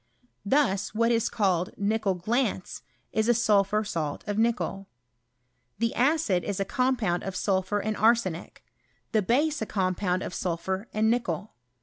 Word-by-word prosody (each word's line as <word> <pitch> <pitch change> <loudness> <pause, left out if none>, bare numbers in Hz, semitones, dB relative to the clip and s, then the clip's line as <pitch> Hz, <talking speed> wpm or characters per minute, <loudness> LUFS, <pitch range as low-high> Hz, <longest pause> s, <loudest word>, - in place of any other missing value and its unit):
Thus, 205 -4 +1
what 230 +1 +3
is 230 -1 +1
called 185 -6 0
nickel 205 -1 0
glance, 215 +1 -1 0.3
is 220 +1 +1
a 240 - +5
sulphur 210 -2 +3
salt 160 -8 -3
of 205 - -2
nickel. 225 -4 0 0.9
Tlie 230 0 +1
acid 255 - +2
is 200 -2 -3
a 195 - 0
compound 245 -8 0
of 195 -1 -5
sulphur 190 +1 0
and 215 +1 -2
arsenic, 215 -7 +1 0.5
the 220 - +3
base 285 +9 +1
a* 220 - -2
compound 185 -1 0
of - - -5
sulphur 190 +4 -3
and 220 +1 +2
nickel. 235 -3 -2
210 Hz, 145 wpm, -27 LUFS, 190-230 Hz, 0.9 s, a